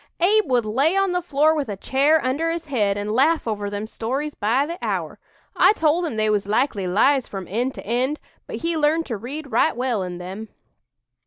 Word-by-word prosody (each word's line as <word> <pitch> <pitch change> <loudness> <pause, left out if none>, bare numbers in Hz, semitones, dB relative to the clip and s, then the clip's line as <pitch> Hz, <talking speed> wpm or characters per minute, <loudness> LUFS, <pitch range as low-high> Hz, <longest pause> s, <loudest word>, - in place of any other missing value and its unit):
Abe 410 +2 +3
would 245 -3 +2
lay 275 - +1
on 390 -1 +2
the 360 0 0
floor 310 -2 +2
with 290 -6 -2
a 200 - -4
chair 280 +9 +2
under 290 +6 0
his 330 0 -3
head, 210 -9 0
and 205 +1 -3
laugh 285 +6 +2
over 205 -2 -2
them 205 +1 -4
stories 265 +7 -3
by 235 +7 +1
the 340 +3 -6
hour. - - -3 0.4
I - - +5
told 330 -1 +1
him 245 - -5
they 215 0 +1
was 205 -2 0
likely 210 -3 0
lies 260 +8 +2
from 195 -3 -7
end 245 +7 -2
to - - -9
end; 255 +7 -1 0.3
but - - -6
he 335 0 0
learned 315 +2 +2
to 230 -5 -4
read 275 +6 -7
right 320 - +2
well 245 -4 -1
in 180 -1 -5
them." 190 +5 -7
260 Hz, 215 wpm, -22 LUFS, 215-310 Hz, 0.4 s, I